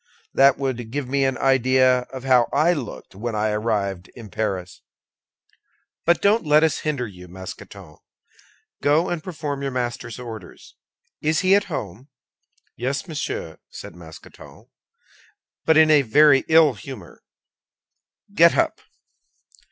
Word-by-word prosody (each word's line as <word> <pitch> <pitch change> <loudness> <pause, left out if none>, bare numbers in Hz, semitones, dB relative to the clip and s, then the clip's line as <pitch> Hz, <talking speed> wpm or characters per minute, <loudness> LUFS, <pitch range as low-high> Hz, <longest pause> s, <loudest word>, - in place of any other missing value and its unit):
That 135 -1 +5
would 125 -4 -3
give 140 +2 -4
me 135 +1 +1
an 135 -1 -1
idea 130 -1 +3
of 130 -1 -8
how 125 -3 +3
I 160 +5 +3
looked 140 -9 -7
when 110 +3 -5
I 105 0 0
arrived 100 -4 -2
in 110 -5 -11
Paris. 95 -3 -4 1.2
But 170 +1 +2
don't 210 +2 +3
let 150 0 +4
us 160 -2 +1
hinder 145 -5 -2
you, 90 -4 -12
Mousqueton; 95 -2 -11 0.8
go 155 +5 +2
and 170 -3 -3
perform 150 -5 -5
your 140 - -2
master's 120 -2 -4
orders. 110 -7 -10 0.5
Is 155 +1 +1
he 190 0 +3
at 205 +1 +3
home?" 120 - -6 0.7
"Yes, 135 - -3
monsieur," 145 - -5
said - - -10
Mousqueton, 80 -3 -14 0.9
"but 160 -1 +4
in 155 0 +6
a 150 -2 +6
very 140 +3 +4
ill 160 -3 +5
humor. 105 -3 -11 1.1
Get - - +5
up!" - - 0
130 Hz, 135 wpm, -22 LUFS, 105-150 Hz, 1.2 s, in